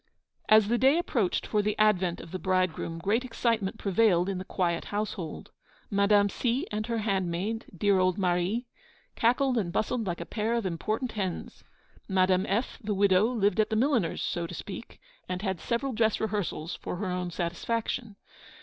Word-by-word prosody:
As 215 Hz, -1 st, +7 dB
the 235 Hz, +2 st, +1 dB
day 270 Hz, +5 st, +5 dB
approached 240 Hz, -, 0 dB
for 210 Hz, -, +1 dB
the 210 Hz, +1 st, -1 dB
advent 190 Hz, -5 st, +2 dB
of 165 Hz, -, -12 dB
the 185 Hz, -, -4 dB
bridegroom, 185 Hz, -3 st, 0 dB
great 205 Hz, +8 st, +1 dB
excitement 230 Hz, -4 st, -1 dB
prevailed 195 Hz, -3 st, +3 dB
in 190 Hz, -2 st, -2 dB
the -, -, -4 dB
quiet 175 Hz, -3 st, -1 dB
household. 205 Hz, -6 st, -4 dB, 0.4 s
Madame 200 Hz, 0 st, +4 dB
C. 245 Hz, -, -1 dB
and 215 Hz, +1 st, -2 dB
her 230 Hz, -1 st, -1 dB
handmaid, 195 Hz, +1 st, -1 dB
dear 200 Hz, +1 st, +3 dB
old 185 Hz, -1 st, +2 dB
Marie, 185 Hz, +5 st, 0 dB, 0.5 s
cackled 250 Hz, +2 st, +2 dB
and 175 Hz, -5 st, -2 dB
bustled 220 Hz, +3 st, -1 dB
like 175 Hz, -1 st, -2 dB
a 170 Hz, -, -5 dB
pair 220 Hz, +6 st, -1 dB
of 230 Hz, -3 st, -1 dB
important 215 Hz, +8 st, -2 dB
hens. 190 Hz, -5 st, -4 dB, 0.4 s
Madame 185 Hz, 0 st, +2 dB
F., 220 Hz, +6 st, -1 dB
the 210 Hz, -2 st, -2 dB
widow, 195 Hz, 0 st, +4 dB
lived 215 Hz, -5 st, +1 dB
at 215 Hz, -, +3 dB
the 220 Hz, -, 0 dB
milliner's, 235 Hz, -, +1 dB
so 170 Hz, -1 st, -2 dB
to -, -, -7 dB
speak, -, -, -8 dB, 0.3 s
and 185 Hz, +1 st, -3 dB
had 190 Hz, -4 st, -1 dB
several 255 Hz, +3 st, -1 dB
dress 220 Hz, -1 st, +2 dB
rehearsals 205 Hz, -6 st, -2 dB
for -, -, -5 dB
her 200 Hz, +4 st, -3 dB
own 180 Hz, 0 st, -2 dB
satisfaction. 210 Hz, +6 st, -2 dB
205 Hz, 175 wpm, -28 LUFS, 185-225 Hz, 0.5 s, As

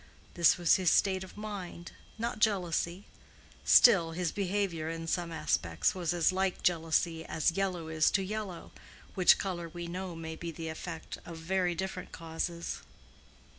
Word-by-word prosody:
This 170 Hz, 0 st, +5 dB
was 175 Hz, -2 st, +4 dB
his 185 Hz, -3 st, +2 dB
state 190 Hz, +1 st, +3 dB
of 190 Hz, -, -12 dB
mind—not 210 Hz, +2 st, -6 dB
jealousy; 185 Hz, -3 st, 0 dB, 0.6 s
still, 175 Hz, -9 st, +6 dB
his 175 Hz, 0 st, -1 dB
behavior 190 Hz, -5 st, -1 dB
in 165 Hz, 0 st, -5 dB
some 170 Hz, +1 st, -1 dB
respects 85 Hz, -, 0 dB
was 175 Hz, -3 st, -2 dB
as 175 Hz, +1 st, +3 dB
like 190 Hz, 0 st, -1 dB
jealousy 165 Hz, -1 st, +1 dB
as 160 Hz, 0 st, +1 dB
yellow 180 Hz, -2 st, -2 dB
is 160 Hz, 0 st, +3 dB
to 195 Hz, -, -2 dB
yellow, 200 Hz, -3 st, -5 dB, 0.4 s
which 185 Hz, -2 st, +6 dB
color 175 Hz, -3 st, -4 dB
we 175 Hz, +1 st, -6 dB
know 180 Hz, +1 st, -5 dB
may 160 Hz, -1 st, -6 dB
be 170 Hz, +1 st, -6 dB
the 165 Hz, 0 st, -6 dB
effect 160 Hz, +1 st, -7 dB
of 170 Hz, -2 st, -9 dB
very 175 Hz, +1 st, 0 dB
different 190 Hz, +1 st, -5 dB
causes. 170 Hz, +1 st, -4 dB
175 Hz, 150 wpm, -31 LUFS, 165-190 Hz, 0.6 s, still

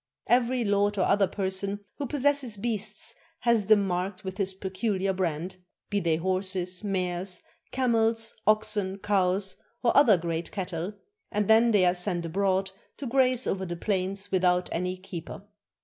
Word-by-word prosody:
Every 245 Hz, 0 st, +2 dB
lord 205 Hz, 0 st, +2 dB
or 185 Hz, -, +3 dB
other 200 Hz, -1 st, +3 dB
person 195 Hz, +1 st, -3 dB, 0.2 s
who 285 Hz, -, -2 dB
possesses 280 Hz, -4 st, +1 dB
beasts 215 Hz, -1 st, -3 dB, 0.3 s
has 230 Hz, -4 st, +2 dB
them 210 Hz, -2 st, +5 dB
marked 185 Hz, +2 st, -2 dB
with 190 Hz, +1 st, -6 dB
his 195 Hz, -1 st, +3 dB
peculiar 190 Hz, 0 st, -1 dB
brand, 180 Hz, -1 st, -2 dB, 0.3 s
be 205 Hz, -, +2 dB
they 170 Hz, -4 st, +1 dB
horses, 185 Hz, +1 st, -2 dB
mares, 185 Hz, -2 st, -1 dB, 0.3 s
camels, 225 Hz, -3 st, +1 dB
oxen, 215 Hz, -3 st, +2 dB
cows, 195 Hz, -1 st, +1 dB, 0.3 s
or 235 Hz, -, +3 dB
other 240 Hz, -9 st, +7 dB
great 165 Hz, 0 st, -3 dB
cattle, 185 Hz, -1 st, -4 dB, 0.4 s
and 210 Hz, -1 st, 0 dB
then 225 Hz, +2 st, +6 dB
they 205 Hz, -5 st, +4 dB
are 175 Hz, -, +4 dB
sent 180 Hz, -1 st, -2 dB
abroad 190 Hz, +2 st, 0 dB, 0.3 s
to 280 Hz, -, -6 dB
graze 255 Hz, 0 st, +3 dB
over 190 Hz, 0 st, -1 dB
the 175 Hz, -2 st, -4 dB
plains 195 Hz, +1 st, -2 dB
without 180 Hz, -1 st, +2 dB
any 180 Hz, +2 st, -2 dB
keeper. 185 Hz, 0 st, -8 dB
195 Hz, 150 wpm, -27 LUFS, 185-215 Hz, 0.4 s, other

